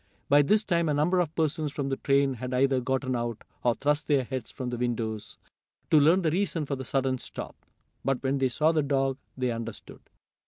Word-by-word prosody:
By 145 Hz, +1 st, +7 dB
this 210 Hz, +9 st, +3 dB
time 170 Hz, -5 st, +1 dB
a 150 Hz, -, +1 dB
number 170 Hz, +5 st, +2 dB
of 165 Hz, -3 st, -1 dB
persons 155 Hz, -1 st, 0 dB
from 140 Hz, -1 st, -3 dB
the 135 Hz, -, -1 dB
train 140 Hz, -1 st, +2 dB
had 125 Hz, +1 st, -4 dB
either 135 Hz, 0 st, +3 dB
gotten 130 Hz, 0 st, -1 dB
out, 120 Hz, -2 st, -3 dB, 0.2 s
or 120 Hz, -1 st, +2 dB
thrust 150 Hz, +1 st, 0 dB
their 140 Hz, -3 st, +3 dB
heads 130 Hz, -2 st, -5 dB
from 125 Hz, -1 st, -5 dB
the 120 Hz, -, -3 dB
windows, 110 Hz, -3 st, -3 dB, 0.5 s
to 155 Hz, -, +7 dB
learn 165 Hz, +6 st, +4 dB
the 160 Hz, -, +2 dB
reason 175 Hz, -3 st, 0 dB
for 140 Hz, -, -2 dB
the 130 Hz, -, -6 dB
sudden 130 Hz, 0 st, 0 dB
stop. -, -, -7 dB, 0.5 s
But 135 Hz, -1 st, 0 dB
when 135 Hz, +1 st, 0 dB
they 130 Hz, -1 st, +2 dB
saw 155 Hz, +6 st, +2 dB
the 160 Hz, -2 st, +2 dB
dog 135 Hz, -2 st, 0 dB, 0.2 s
they 125 Hz, -1 st, 0 dB
understood. 115 Hz, -2 st, -7 dB
135 Hz, 210 wpm, -28 LUFS, 125-150 Hz, 0.5 s, By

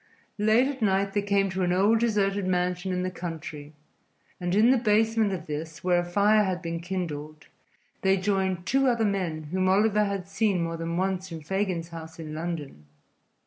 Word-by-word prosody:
Late 220 Hz, +5 st, +4 dB
at 275 Hz, -3 st, -5 dB
night 195 Hz, -1 st, +1 dB
they 205 Hz, -, +1 dB
came 200 Hz, -1 st, +1 dB
to 190 Hz, 0 st, -2 dB
an 175 Hz, -1 st, +1 dB
old 200 Hz, +5 st, +3 dB
deserted 205 Hz, -4 st, +1 dB
mansion 180 Hz, 0 st, 0 dB
in 180 Hz, 0 st, -1 dB
the 185 Hz, -, -2 dB
country, 160 Hz, -4 st, -7 dB, 0.7 s
and 175 Hz, 0 st, -1 dB
in 225 Hz, +4 st, +5 dB
the 260 Hz, -, +4 dB
basement 220 Hz, -1 st, +2 dB
of 185 Hz, -3 st, -4 dB
this, 155 Hz, +1 st, -6 dB
where 180 Hz, -1 st, +3 dB
a -, -, 0 dB
fire 205 Hz, +4 st, +3 dB
had 185 Hz, -3 st, -1 dB
been 165 Hz, 0 st, -4 dB
kindled, 155 Hz, -4 st, -5 dB, 0.6 s
they 190 Hz, 0 st, +3 dB
joined 190 Hz, -2 st, 0 dB
two 270 Hz, +1 st, +2 dB
other 235 Hz, -3 st, +2 dB
men 170 Hz, -7 st, -2 dB
whom 185 Hz, 0 st, +1 dB
Oliver 210 Hz, +2 st, +3 dB
had 200 Hz, -2 st, -3 dB
seen 195 Hz, -3 st, +1 dB
more 165 Hz, 0 st, -3 dB
than 165 Hz, +1 st, -3 dB
once 190 Hz, 0 st, -1 dB
in 165 Hz, -1 st, -6 dB
Fagin's 185 Hz, -1 st, -2 dB
house 160 Hz, -1 st, -9 dB
in 155 Hz, -2 st, -7 dB
London. 155 Hz, -, -5 dB
185 Hz, 185 wpm, -27 LUFS, 170-205 Hz, 0.7 s, in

